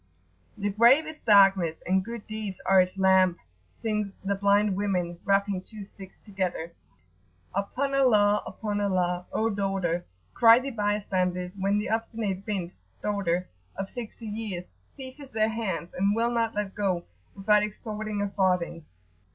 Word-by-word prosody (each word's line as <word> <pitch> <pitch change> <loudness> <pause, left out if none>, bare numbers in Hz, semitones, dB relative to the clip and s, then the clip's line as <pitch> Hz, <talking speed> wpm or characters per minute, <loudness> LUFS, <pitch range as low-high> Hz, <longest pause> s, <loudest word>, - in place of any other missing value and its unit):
"The 205 0 -1
grave 240 +9 +5
is 310 0 -8
darkness, 195 -6 +5
and 190 +1 +2
good 230 +1 -7
deeds 215 -3 -5
are 190 -1 +6
its 185 +1 -3
lamp!" 190 -2 +4 0.4
sing 210 -3 -1
the 200 - +1
blind 200 0 +2
women, 180 -4 -1
rapping 200 -1 +1
two 210 +1 -10
sticks 195 -1 -13
together: 185 -5 -4 0.8
"upon 255 +8 -2
Allah! 210 -6 +4
upon 205 -2 -3
Allah! 180 -2 0
O 225 +1 0
daughter!" 195 -4 -1 0.3
cry 230 0 +7
the 265 +2 -3
bystanders, 185 -4 -1
when 200 +1 +1
the 210 +2 -2
obstinate 220 -3 -2
"bint"[FN#18] 170 - -6
(daughter) 185 -4 0 0.3
of 195 0 -5
sixty 235 -1 -8
years 210 -4 -4 0.3
seizes 265 +1 -9
their 220 -1 +1
hands, 220 -6 -3
and 200 +3 +1
will 230 +1 +1
not 230 -2 0
let 205 -2 -2
go 190 -4 -1 0.3
without 210 +1 +3
extorting 210 0 -4
a 205 - -2
farthing. 180 -4 0
200 Hz, 145 wpm, -27 LUFS, 185-215 Hz, 0.8 s, cry